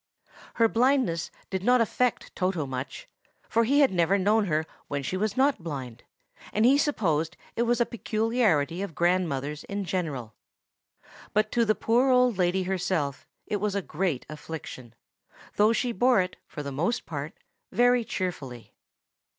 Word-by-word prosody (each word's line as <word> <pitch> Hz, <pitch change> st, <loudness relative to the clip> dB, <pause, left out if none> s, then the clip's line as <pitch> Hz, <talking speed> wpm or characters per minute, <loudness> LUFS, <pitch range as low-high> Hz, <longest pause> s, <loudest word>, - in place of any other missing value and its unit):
Her 230 Hz, -1 st, +4 dB
blindness 240 Hz, -8 st, +1 dB, 0.2 s
did 190 Hz, -1 st, -2 dB
not 250 Hz, +3 st, +4 dB
affect 240 Hz, +2 st, 0 dB
Toto 180 Hz, -5 st, 0 dB
much; 130 Hz, 0 st, -6 dB, 0.4 s
for 230 Hz, 0 st, +2 dB
he 280 Hz, +5 st, +4 dB
had 275 Hz, -, +5 dB
never 180 Hz, +2 st, +2 dB
known 210 Hz, +2 st, +3 dB
her 155 Hz, -3 st, 0 dB, 0.2 s
when 140 Hz, -1 st, -3 dB
she 185 Hz, -, -2 dB
was 210 Hz, +4 st, -1 dB
not 270 Hz, -5 st, +3 dB
blind, 130 Hz, -8 st, -6 dB, 0.5 s
and 215 Hz, +2 st, +2 dB
he 265 Hz, +3 st, +6 dB
supposed 170 Hz, -, 0 dB, 0.2 s
it -, -, 0 dB
was 240 Hz, 0 st, +2 dB
a 240 Hz, -, +4 dB
peculiarity 215 Hz, -, 0 dB
of 195 Hz, -6 st, -5 dB
grandmothers 155 Hz, -5 st, 0 dB
in 200 Hz, -1 st, -4 dB
general. 150 Hz, -, -3 dB, 1.0 s
But 215 Hz, +1 st, +2 dB
to 235 Hz, -1 st, +2 dB
the 215 Hz, 0 st, +2 dB
poor 245 Hz, +4 st, +2 dB
old 250 Hz, -5 st, +3 dB
lady 180 Hz, +1 st, +2 dB
herself 180 Hz, -6 st, -2 dB, 0.2 s
it 210 Hz, -, -1 dB
was 205 Hz, 0 st, -1 dB
a 200 Hz, -, 0 dB
great 175 Hz, -10 st, -2 dB
affliction, 150 Hz, -6 st, -8 dB, 0.6 s
though 210 Hz, +2 st, +5 dB
she 240 Hz, +1 st, 0 dB
bore 245 Hz, -1 st, +3 dB
it, 185 Hz, 0 st, -1 dB
for 150 Hz, -, -7 dB
the 140 Hz, -, -5 dB
most 170 Hz, -, -1 dB
part, -, -, -5 dB, 0.4 s
very 245 Hz, 0 st, +4 dB
cheerfully. 140 Hz, -, -5 dB
190 Hz, 160 wpm, -27 LUFS, 160-230 Hz, 1.0 s, he